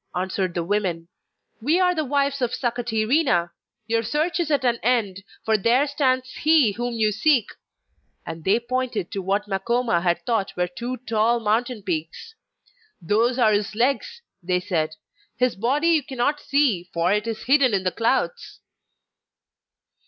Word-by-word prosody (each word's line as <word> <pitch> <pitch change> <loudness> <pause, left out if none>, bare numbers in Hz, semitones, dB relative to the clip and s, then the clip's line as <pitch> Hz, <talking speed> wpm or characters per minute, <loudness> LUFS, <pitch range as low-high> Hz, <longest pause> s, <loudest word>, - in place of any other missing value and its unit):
answered 185 0 -2
the 170 - -1
women. 175 -3 -1 0.5
'We 305 +9 +2
are 360 -1 +3
the 315 -3 -1
wives 280 0 0
of 245 -1 0
Sakatirina; 235 - 0 0.3
your 230 +1 0
search 300 +10 -1
is 335 -3 -1
at 285 -3 +1
an 240 -1 +2
end, 225 -6 +1 0.3
for 220 -1 +2
there 240 +7 +3
stands 260 -3 0
he 305 -7 +4
whom 240 +3 -4
you 215 -2 +2
seek!' 235 +1 +2 0.8
And 165 -1 -7
they 200 +6 +3
pointed 240 -5 -3
to 195 - -3
what 200 +3 -1
Makoma 215 -1 0
had 175 -1 0
thought 225 -7 -1
were 180 0 +1
two 240 +8 -5
tall 225 +2 +2
mountain 225 +1 -1
peaks. 170 - -4 0.7
'Those 225 +8 +1
are 220 -4 +4
his 205 +1 -1
legs,' 465 - -1 0.2
they 180 +1 0
said; 160 -4 -2 0.4
'his 250 -1 +1
body 270 - +1
you 325 -2 +4
cannot 265 +3 -1
see, 260 -13 +1
for 170 +3 +1
it 210 +2 -1
is 225 -1 -4
hidden 270 -1 +4
in 195 -2 0
the 185 - 0
clouds. 265 - -1
230 Hz, 160 wpm, -23 LUFS, 195-260 Hz, 0.8 s, he